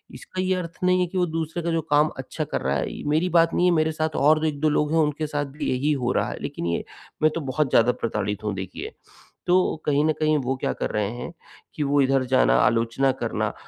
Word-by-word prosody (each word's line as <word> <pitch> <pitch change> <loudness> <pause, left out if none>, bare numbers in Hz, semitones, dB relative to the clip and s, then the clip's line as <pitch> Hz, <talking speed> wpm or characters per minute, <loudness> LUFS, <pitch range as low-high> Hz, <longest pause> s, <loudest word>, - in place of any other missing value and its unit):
इसका 185 - -6
ये 185 0 +1
अर्थ 170 -2 -5
नहीं 185 0 +3
है 180 - +1
कि 185 +2 -5
वो 180 - +3
दूसरे 165 0 -3
का 170 - -1
जो 165 0 +1
काम 150 +1 +4
अच्छा - - -4
कर - - -3
रहा - - 0
है - - -2
ये - - -8
मेरी 160 +4 +2
बात 165 -1 +3
नहीं 180 - +2
है, - - +4
मेरे 155 0 +2
साथ 155 0 -2
और 155 +2 +4
2 160 - -1
1-2 155 0 0
लोग 150 0 +1
हैं, 165 - +3
उनके 150 0 0
साथ 145 -1 -2
भी 140 +2 -5
यही 130 +4 +1
हो 125 - +1
रहा - - 0
है। - - -6
लेकिन - - -5
ये 85 - -1 0.4
मैं 155 0 +4
तो 165 - -2
बहुत 140 +1 -1
ज़्यादा 120 +1 +4
प्रताड़ित 105 -3 -3
हूँ, 105 -2 -1
देखिए। 95 -1 -6 0.6
तो 180 +1 +3
कहीं 145 0 +2
न 155 - +3
कहीं 155 -1 +2
वो 130 +2 -1
क्या - - -1
कर - - -3
रहे 105 -1 0
हैं 120 +7 -6 0.4
कि 150 - -1
वो 145 0 +2
इधर 135 -1 +2
जाना, - - +4
आलोचना 115 - +2
करना - - -1
150 Hz, 255 wpm, -24 LUFS, 130-165 Hz, 0.6 s, काम